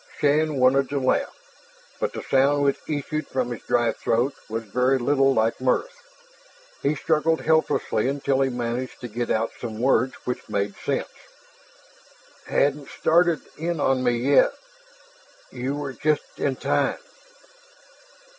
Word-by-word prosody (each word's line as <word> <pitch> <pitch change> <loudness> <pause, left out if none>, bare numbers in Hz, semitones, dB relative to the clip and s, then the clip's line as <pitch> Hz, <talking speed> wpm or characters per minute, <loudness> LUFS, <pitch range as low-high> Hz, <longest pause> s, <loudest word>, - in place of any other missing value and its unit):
Shann 150 +1 +2
wanted 135 +1 +3
to 140 - -1
laugh, 130 -1 +1 0.7
but - - -1
the - - -6
sound 140 +2 +3
which 140 -1 +1
issued 155 0 -3
from 125 -2 -2
his 120 - -5
dry 120 -1 +1
throat 120 +5 0 0.2
was 115 +1 -3
very 125 +5 +1
little 135 +2 +3
like 115 -1 +1
mirth. - - 0 0.8
He 145 +2 +1
struggled 160 +2 +1
helplessly 160 -7 +1
until 135 -1 0
he 135 - +2
managed 120 +1 -4
to 125 - -5
get 120 +1 -4
out 110 +1 0
some 110 -3 -5
words 130 +1 +2
which 125 - -4
made 100 0 -1
sense. - - -2 0.8
"... - - -27
hadn't 140 0 +1
started 170 0 +2 0.2
in 170 0 -2
on 135 -2 +2
me 120 -1 +2 0.2
yet. - - +5 1.0
You 130 +2 -3
were 145 -2 -4
just 150 +2 -1
in 135 -2 0
time." - - 0
135 Hz, 145 wpm, -24 LUFS, 120-145 Hz, 1.0 s, yet